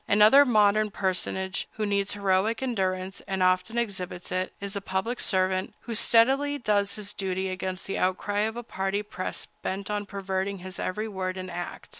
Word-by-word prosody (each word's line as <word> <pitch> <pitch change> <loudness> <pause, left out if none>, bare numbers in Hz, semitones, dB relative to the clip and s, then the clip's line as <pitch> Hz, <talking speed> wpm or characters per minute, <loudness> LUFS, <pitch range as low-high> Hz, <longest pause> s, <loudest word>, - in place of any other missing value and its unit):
Another 215 +8 +7
modern 215 -3 +4
personage 190 -1 -1
who 215 - -2
needs 200 -1 0
heroic 205 +4 +1
endurance, 190 -6 -1
and 190 -1 0
often 185 +5 +2
exhibits 190 -6 -3
it, 185 0 -1
is 200 -1 -4
the 200 - -3
public 195 +6 -2
servant 185 -1 +1
who 235 - -5
steadily 270 +6 +4
does 205 -5 +1
his 210 -1 -5
duty 190 -1 -2
against 185 0 -4
the 195 - -2
outcry 190 +2 0
of 220 +2 0
a 240 - -4
party 195 -1 -2
press 185 -3 -4 0.2
bent 195 +2 -3
on 205 -1 -2
perverting 195 0 -2
his 185 +1 -7
every 215 +4 -2
word 190 -2 -3
and 185 -1 -5
act. 175 0 -6
195 Hz, 175 wpm, -27 LUFS, 185-215 Hz, 0.2 s, Another